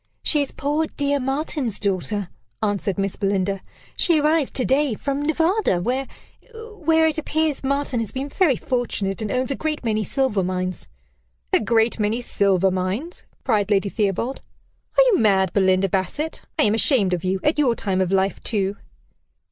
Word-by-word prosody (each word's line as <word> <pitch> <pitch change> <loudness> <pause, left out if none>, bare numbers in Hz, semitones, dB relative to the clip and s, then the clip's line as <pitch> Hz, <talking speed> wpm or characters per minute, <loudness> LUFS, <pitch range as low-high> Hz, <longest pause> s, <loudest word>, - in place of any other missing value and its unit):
"She 300 - +4
is 280 - -3
poor 300 +3 -1
dear 285 -1 -1
Martin's 270 -4 -2
daughter," 200 0 -1 0.3
answered 205 -2 -1
Miss 195 -1 -1
Belinda. 195 -1 0 0.3
"She 335 -4 +3
arrived 305 -1 +1
to 255 - +1
day 275 -3 +2
from 280 +5 -2
Nevada, 325 - +1
where 255 +8 -1 0.7
where 320 -4 +2
it 315 0 +1
appears 315 -2 -1
Martin 275 -2 -1
has 225 -3 -3
been 265 +2 -4
very 310 -4 +2
fortunate, 225 -5 -2
and 215 - -3
owns 255 +2 0
a - - 0
great 305 -1 -3
many 215 -2 0
silver 260 -3 0
mines" 185 0 -3 0.7
"A - - +5
'great 225 +1 +2
many' 215 +3 +1
silver 195 -5 +2
mines!" 190 - -3 0.2
cried 210 -4 +1
Lady 200 -1 +2
Theobald. 215 +6 -1 0.6
"Are - - +8
you - - +3
mad, 190 -4 +3
Belinda 190 -1 +3
Bassett? 195 - -2 0.2
I 305 - +4
am 210 - +3
ashamed 225 -5 +3
of 175 - -2
you. 190 +1 0
At 300 +1 +1
your 255 -5 +3
time 190 -4 -1
of 185 -1 0
life 195 0 +1
too!" 200 -2 -1
230 Hz, 170 wpm, -22 LUFS, 195-285 Hz, 0.7 s, Are